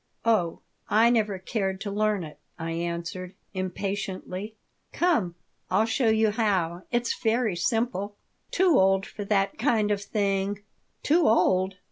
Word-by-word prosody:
"Oh, 205 -8 +1 0.3
I 225 +3 +5
never 215 -4 +1
cared 190 0 -2
to 205 - -3
learn 210 -2 +1
it," 150 -2 -10 0.2
I 165 0 -4
answered, 170 +2 -4 0.2
impatiently 190 +1 -4 0.4
"Come. 230 - +1 0.3
I'll 195 +4 +3
show 225 +1 +1
you 220 -1 +3
how. 190 -6 0
It's 240 -1 0
very 225 -3 +1
simple." 205 +1 -1 0.3
"Too 360 -5 +4
old 195 0 +3
for 210 - -7
that 195 0 +1
kind 220 -4 +2
of 200 -1 0
thing." 200 -1 -1 0.4
"Too 325 +2 +3
old? 190 -3 +3
200 Hz, 135 wpm, -26 LUFS, 185-220 Hz, 0.4 s, I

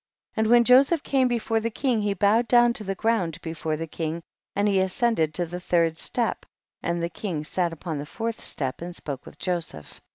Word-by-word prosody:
48. - - -5
And 220 +1 +2
when 240 0 +7
Joseph 275 +6 +5
came 265 -2 +2
before 230 -2 0
the 230 +1 -1
king 240 -1 0
he 205 -1 0
bowed 210 +5 +3
down 240 -1 +5
to 220 - -5
the 195 -1 -3
ground 190 -8 0
before 160 -1 -3
the 165 - -3
king, 165 +1 -4 0.3
and 205 +1 +2
he 195 -2 +3
as 190 -1 -1
cended 225 -11 +2
to 175 - 0
the 175 +2 -6
third 170 -2 +2
step, 230 +7 -1 0.4
and 170 0 -1
the - - +1
king 170 -3 -4
sat 170 +2 -1
upon 165 -2 -5
the 145 - -6
fourth 230 +4 -4
step 135 0 -3
and 175 0 -6
spoke 140 -6 -6
with - - -12
Joseph. 170 - -4
190 Hz, 220 wpm, -25 LUFS, 165-230 Hz, 0.4 s, when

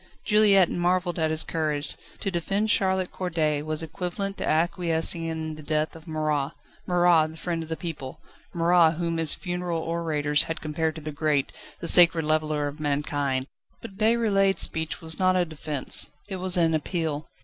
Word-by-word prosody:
Juliette 205 -4 +5
marvelled 175 0 0
at 160 -1 +1
his 160 0 +2
courage; 150 -3 -2 0.3
to 195 - -2
defend 195 +5 -1
Charlotte 190 -1 +1
Corday 160 -5 -1
was 155 +1 -3
equivalent 195 +4 -4
to - - -3
acquiescing 165 0 +1
in 160 -1 -4
the 155 - -10
death 155 +1 -2
of 165 +1 -13
Marat: 155 -3 -1 0.3
Marat, 175 -3 +4
the 160 - -12
friend 170 0 -3
of 160 - -8
the 160 - -3
people; 155 -3 -7 0.3
Marat, 170 -1 +3
whom 170 0 -2
his 160 -2 +3
funeral 175 -2 -3
orators 155 -3 0
had 165 - -3
compared 155 +1 -2
to 160 - -8
the 155 0 -5
Great, 145 -1 0 0.3
the 170 - -2
Sacred 170 -2 +7
Leveller 155 -1 0
of 145 +2 -7
Mankind! 145 -2 -1 0.3
But 195 -4 -11
Déroulède's 215 -4 +3
speech 160 +1 -3
was 160 +1 -3
not 185 0 +3
a 180 -1 +2
defence, 155 -3 +1 0.2
it 195 -2 -4
was 185 0 -1
an 165 -2 +3
appeal. 155 -1 -2
165 Hz, 170 wpm, -25 LUFS, 155-180 Hz, 0.3 s, Sacred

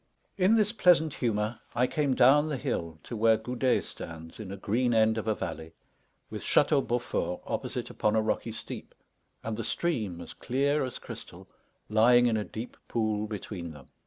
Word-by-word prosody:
In 195 +3 +4
this 210 -2 +3
pleasant 175 -8 +4
humour 110 -1 -1 0.2
I 125 - +3
came 140 -1 0
down 140 +5 +5
the 145 - -1
hill 85 -9 -3
to 120 - -6
where 110 0 +4
Goudet 125 +3 0
stands 80 +2 -8
in 100 -3 -6
a 100 - -6
green 120 +5 +1
end 110 0 +4
of 110 - -6
a 110 - +2
valley, 80 -3 -6 0.6
with - - -5
Château 145 -1 +4
Beaufort 115 -7 -1
opposite - - -3
upon 105 0 +1
a 110 - +4
rocky 110 +1 -1
steep, 110 - -6 0.5
and 110 - -3
the 115 - -4
stream, 110 - -1
as - - -8
clear 140 +3 0
as 130 - -4
crystal, - - -10 0.4
lying 120 +3 +5
in 115 -2 +3
a 105 - 0
deep 110 +3 -7
pool 110 -2 0
between 95 -5 -6
them. 70 -3 -14
115 Hz, 180 wpm, -29 LUFS, 105-130 Hz, 0.6 s, down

